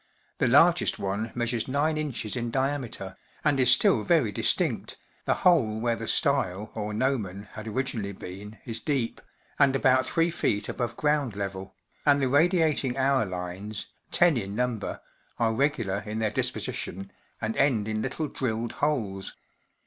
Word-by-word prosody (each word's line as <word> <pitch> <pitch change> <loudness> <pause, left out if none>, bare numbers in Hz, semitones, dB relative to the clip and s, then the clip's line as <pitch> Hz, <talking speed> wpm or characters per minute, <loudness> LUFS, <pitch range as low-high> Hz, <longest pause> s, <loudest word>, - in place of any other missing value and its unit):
The - - +3
largest - - +5
one 100 +4 -3
measures 120 -1 0
gin, 145 +4 +1
in 125 -5 -2
diameter, 130 -7 -2 0.3
and 145 -3 +3
is 125 -1 +4
still 195 - +5
very 160 - +3
distinct, - - 0 0.3
the - - +2
hole 120 -12 +4
where 115 0 +1
the 115 -1 -6
style, 110 -7 +1
or 105 -1 -4
gnomon, 105 -4 -2
had 110 +1 -8
originally 110 -3 -2
been 100 +3 -9
is 115 -2 -4
deep, 130 -2 -2 0.4
and 140 -2 +5
about 130 -1 +3
3ft 165 -11 +1
above 120 -1 -3
ground 150 -7 +1
level, 95 -1 -5 0.3
and 145 -1 +4
the 135 - +1
radiating 150 -3 +2
hour 135 -4 +2
lines, 90 +3 -5 0.2
ten 175 -5 +5
in 100 -3 -4
number, 120 -2 -2 0.4
are 115 -1 +1
regular 115 -7 0
in 105 +1 -6
their 110 -1 0
disposition 95 -2 -2 0.3
and 110 +1 -2
end 120 -7 +2
in 110 0 -1
little 135 +6 -2
drilled 115 -4 -2
holes. 110 -11 -2
115 Hz, 150 wpm, -27 LUFS, 105-140 Hz, 0.4 s, largest